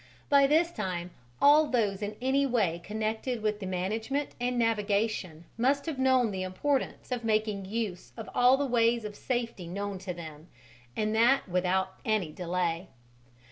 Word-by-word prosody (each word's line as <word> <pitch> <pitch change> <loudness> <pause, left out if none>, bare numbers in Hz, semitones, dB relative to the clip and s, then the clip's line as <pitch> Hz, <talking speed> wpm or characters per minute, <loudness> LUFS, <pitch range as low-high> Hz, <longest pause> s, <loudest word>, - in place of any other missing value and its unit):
By 280 -1 +6
this 325 +4 +3
time 180 - -4 0.3
all 300 +2 +6
those 210 -7 0
in 210 0 -3
any 265 +3 +2
way 210 -11 +1
connected 220 +3 -3
with 210 -1 0
the 195 - -5
management 220 +10 -2
and 245 0 0
navigation 210 -6 0
must 275 +4 +2
have 310 -5 -4
known 260 -4 +3
the 190 -1 -3
importance 260 +11 -2
of 245 -1 -2
making 215 -3 0
use 205 -3 -4
of 225 - -7
all 250 +2 +5
the 285 - 0
ways 235 -2 +2
of 210 -1 -6
safety 235 -8 -3
known 200 +2 -4
to 190 0 -5
them 160 -2 -9 0.5
and 215 0 0
that 240 +4 +4
without 185 +1 0
any 215 -8 0
delay. 175 +1 -2
215 Hz, 160 wpm, -29 LUFS, 185-250 Hz, 0.5 s, By